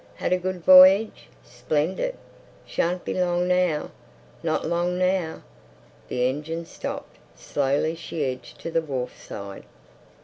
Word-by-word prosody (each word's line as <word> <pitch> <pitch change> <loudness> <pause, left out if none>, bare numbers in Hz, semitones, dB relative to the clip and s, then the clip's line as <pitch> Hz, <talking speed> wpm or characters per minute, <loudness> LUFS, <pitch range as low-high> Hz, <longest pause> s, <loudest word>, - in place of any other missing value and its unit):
"Had - - -1
a 185 - +2
good 185 -1 -4
voyage?" 185 - +7
"Splendid!" 170 - -2 0.5
"Shan't 175 +1 -1
be - - -2
long 180 -1 +1
now!" 180 -4 +1 0.5
"Not - - -1
long 175 +1 0
now." 185 -3 0 0.6
The 125 0 0
engines 160 +5 -4
stopped. - - -6 0.2
Slowly 145 +3 0
she 165 -2 -4
edged 130 -1 -6
to 165 - -5
the 165 - +2
wharf 135 -5 -4
side. 100 -1 -8
170 Hz, 130 wpm, -25 LUFS, 145-180 Hz, 0.6 s, voyage